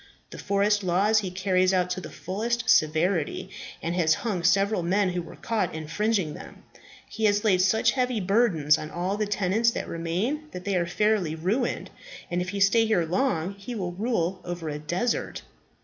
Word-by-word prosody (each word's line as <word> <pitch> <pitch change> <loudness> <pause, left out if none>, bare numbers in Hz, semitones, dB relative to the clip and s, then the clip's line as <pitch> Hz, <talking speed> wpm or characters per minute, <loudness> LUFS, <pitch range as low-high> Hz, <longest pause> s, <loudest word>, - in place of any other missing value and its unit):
The - - -9
forest 205 +1 +1
laws 195 +5 +3
he 195 -3 -3
carries 185 0 +1
out 180 -1 +1
to 185 +1 -2
the - - -8
fullest 225 +5 -3
severity, 160 -1 +2 0.3
and 170 - -1
has 165 -3 +3
hung 200 -6 -1
several 195 +3 +2
men 190 +3 +1
who 180 0 -2
were 170 - -11
caught 225 -7 -2
infringing 165 +2 -1
them. - - -12 0.4
He 220 - -2
has 205 0 +2
laid 190 -4 +3
such 195 +4 +3
heavy 250 -3 0
burdens 185 -7 +3
on 155 - -6
all 180 +5 -2
the 210 0 -1
tenants 205 +3 +2
that - - -4
remain 185 - -2
that 180 0 -7
they 200 -1 0
are 170 -1 +1
fairly 195 -3 +1
ruined, 205 +10 -1 0.4
and 175 +1 0
if 180 - -3
he 200 +1 -4
stay 225 +3 +4
here 185 -6 +2
long 185 -1 0
he 200 +5 -8
will 185 -5 -3
rule 190 -2 -1
over 175 -2 -5
a 150 0 -4
desert. 175 +10 -2
190 Hz, 185 wpm, -26 LUFS, 175-215 Hz, 0.4 s, stay